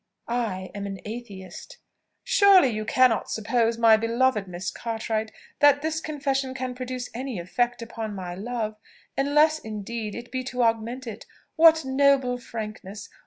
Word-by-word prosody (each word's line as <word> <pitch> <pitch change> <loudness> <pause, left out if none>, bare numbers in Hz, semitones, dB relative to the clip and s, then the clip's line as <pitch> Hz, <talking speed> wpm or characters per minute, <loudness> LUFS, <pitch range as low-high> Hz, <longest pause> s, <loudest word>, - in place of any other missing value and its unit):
I 220 -6 -2
am 200 0 -5
an 195 -1 -6
Atheist." 205 -5 -8 0.5
"Surely 390 -8 +6
you 215 -2 -3
cannot 250 0 +3
suppose, 230 +1 0
my 225 -1 +6
beloved 230 -2 +1
Miss 180 +1 -4
Cartwright, 220 -1 -3 0.3
that 290 0 +5
this 320 0 -1
confession 275 -4 -2
can 255 -1 -3
produce 255 0 -5
any 255 -1 -4
effect 240 +8 -1
upon 225 -2 -6
my 180 -2 -5
love, 215 +2 -4 0.4
unless 300 +3 +3
indeed 215 -1 -5
it 235 0 -8
be 260 0 -2
to 250 -1 -1
augment 230 +3 0
it. 225 -3 -8 0.3
What 320 -2 +6
noble 265 -2 +3
frankness! 215 -3 -7
235 Hz, 145 wpm, -25 LUFS, 215-260 Hz, 0.5 s, Surely